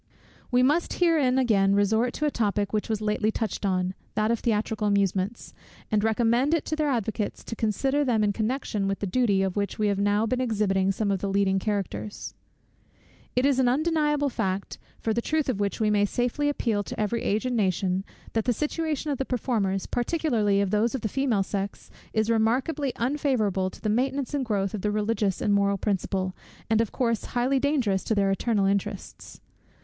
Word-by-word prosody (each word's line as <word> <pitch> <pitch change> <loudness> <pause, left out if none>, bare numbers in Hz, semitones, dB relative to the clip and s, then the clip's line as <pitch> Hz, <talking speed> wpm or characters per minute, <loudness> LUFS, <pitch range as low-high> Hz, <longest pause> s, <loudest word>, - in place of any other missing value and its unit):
We 250 0 +3
must 300 +6 +2
here 335 -3 +3
again 240 -7 +3
resort 220 +4 +2
to 300 - -2
a 295 - +1
topic 205 -3 -1
which 210 +1 -1
was 220 -1 -1
lately 210 0 +1
touched 220 -2 -2
on, 185 -1 0 0.2
that 215 +1 +2
of 235 - 0
theatrical 215 -1 0
amusements; 200 +1 0 0.4
and 210 -1 +2
recommend 235 +6 +2
it 325 - -2
to 310 - -2
their 305 -1 0
advocates 220 -4 -2
to 230 - -6
consider 265 +7 0
them 235 -5 +2
in 205 -1 +2
connection 215 -2 -1
with 195 0 -1
the - - -3
duty, 200 -1 +2
of 190 -1 -2
which 200 -1 -2
we 210 -1 +1
have 200 -1 0
now 205 +2 +2
been 255 +3 -1
exhibiting 200 -5 +1
some 200 +1 -1
of 195 - 0
the 200 - -2
leading 195 -1 +2
characters. 205 0 -4 1.0
It 250 +2 +3
is 275 -2 +3
an 255 - +3
undeniable 295 0 +1
fact, 200 -5 -3 0.2
for 225 - -1
the 235 - 0
truth 310 +3 0
of 245 -6 -1
which 200 -1 -1
we 215 -1 +2
may 205 -1 +3
safely 245 +7 0
appeal 230 -7 0
to - - -7
every 215 +2 0
age 215 +5 0
and 250 -1 0
nation, 190 -2 0 0.3
that 225 -1 0
the 245 - +2
situation 300 +2 -2
of 275 - -2
the - - +1
performers, 220 -7 -1
particularly 240 -7 +1
of 200 -1 -1
those 220 +4 +1
of 260 - -3
the 215 - -2
female 245 -5 +1
sex, 200 0 -5 0.2
is 220 0 +1
remarkably 255 +6 +1
unfavourable 235 -8 0
to - - -14
the - - -3
maintenance 265 +5 0
and 280 -2 0
growth 200 -4 -1
of 210 - -3
the 210 - 0
religious 210 -2 0
and 205 - +2
moral 200 0 +2
principle, 190 -2 -1 0.4
and 220 0 +4
of 230 - -2
course 230 -4 0
highly 255 +3 +2
dangerous 255 -10 +1
to 220 - 0
their 195 -1 +2
eternal 205 0 +1
interests. 195 0 -3
220 Hz, 195 wpm, -26 LUFS, 200-255 Hz, 1.0 s, and